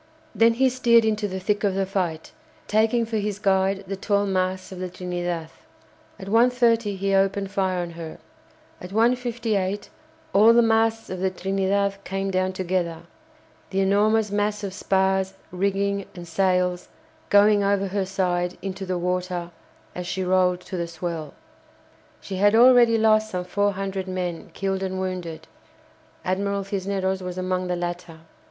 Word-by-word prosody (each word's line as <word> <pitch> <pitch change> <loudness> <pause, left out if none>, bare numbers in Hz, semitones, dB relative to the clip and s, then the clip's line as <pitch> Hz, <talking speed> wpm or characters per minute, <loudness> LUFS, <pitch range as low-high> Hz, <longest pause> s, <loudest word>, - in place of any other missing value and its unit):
Then 230 +1 +4
he 265 +2 +3
steered 240 -3 +4
into 215 -1 0
the 190 -1 -4
thick 205 +3 -1
of 195 -2 +1
the 195 0 +1
fight, 180 -5 -3 0.3
taking 225 +2 +2
for 225 0 -2
his 205 -1 -2
guide 195 -1 +1
the 195 +1 -4
tall 200 +1 0
masts 185 -1 -1
of 185 - -8
the 185 0 -4
"Trinidad." 175 -2 -4 0.7
At 190 - -9
1.30 230 -2 +3
he 195 +1 -1
opened 195 0 +1
fire 190 -2 0
on 170 - -6
her. 165 -1 -8 0.6
At 180 - -8
1.58 225 -3 0 0.4
all 215 +4 +7
the 235 0 +5
masts 225 -1 +1
of 185 - -4
the 190 +1 +1
"Trinidad" 195 +1 -1
came 195 0 -3
down 185 0 0
together, 175 -3 -2 0.7
the 195 0 0
enormous 210 +2 +2
mass 205 0 -1
of 195 -2 -4
spars, 190 0 +1 0.2
rigging, 200 +1 -1
and 175 -1 -9
sails 180 0 +1 0.4
going 205 0 +5
over 200 -1 +1
her 195 +1 -1
side 180 -2 -1
into 190 0 -5
the 180 -1 -1
water 180 -1 -2 0.4
as 180 -1 -6
she 190 - -2
rolled 180 -1 +2
to 185 - -6
the 170 -1 -2
swell. 165 -2 -5 0.8
She 190 - -6
had 205 +3 +4
already 240 -1 +6
lost 215 -1 +3
some 180 -2 -3
four 205 +2 0
hundred 195 0 -4
men 180 -2 -4
killed 195 -1 -2
and 190 -1 -3
wounded 180 -4 -5 0.8
(Admiral 200 +2 -1
Cisneros 190 -1 -2
was 180 0 -6
among 185 0 -1
the 180 - -1
latter). 175 -2 -5
195 Hz, 160 wpm, -24 LUFS, 185-205 Hz, 0.8 s, all